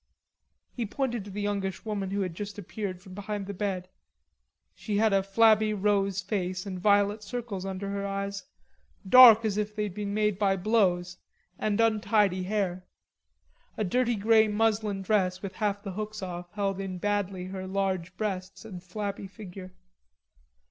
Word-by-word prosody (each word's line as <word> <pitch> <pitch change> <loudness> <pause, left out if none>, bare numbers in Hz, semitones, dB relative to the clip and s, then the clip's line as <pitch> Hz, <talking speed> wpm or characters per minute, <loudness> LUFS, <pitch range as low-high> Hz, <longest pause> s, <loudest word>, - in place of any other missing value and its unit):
He 235 -3 -3
pointed 240 -3 -2
to 205 - -9
a 205 - -5
youngish 200 -2 -2
woman 205 -3 -2
who 200 +1 -1
had 185 -3 -2
just 205 +3 -6
appeared 195 -1 -5
from 190 -2 -12
behind 205 0 -4
the 200 - -5
bed. 190 -2 -3 0.9
She 210 -2 -3
had 220 -1 +3
a 195 - +4
flabby 215 +2 +4
rosy 195 -2 +1
face 185 -2 -2
and 185 -2 -5
violet 205 +2 +3
circles 210 -3 -5
under 195 +1 -4
her 200 0 -3
eyes, 200 0 -3 0.6
dark 230 -1 +9
as 210 -2 0
if 210 0 -3
they'd 210 -3 -2
been 205 0 -4
made 210 -2 +1
by 195 -2 +3
blows, 185 -3 +1 0.4
and 215 0 0
untidy 215 -4 +2
hair. 185 -2 -2 0.9
A 215 - 0
dirty 240 +5 +1
grey 220 +1 +4
muslin 210 -2 0
dress 185 -2 +1
with 195 -1 -5
half 205 -1 -1
the 195 - -5
hooks 215 +1 -5
off 175 -1 -6
held 195 -2 -1
in 190 -2 -4
badly 200 -1 -1
her 190 0 -6
large 185 -2 -2
breasts 190 -1 -4
and 185 -5 -8
flabby 200 +2 -5
figure. 190 -2 -10
200 Hz, 160 wpm, -28 LUFS, 190-215 Hz, 0.9 s, dark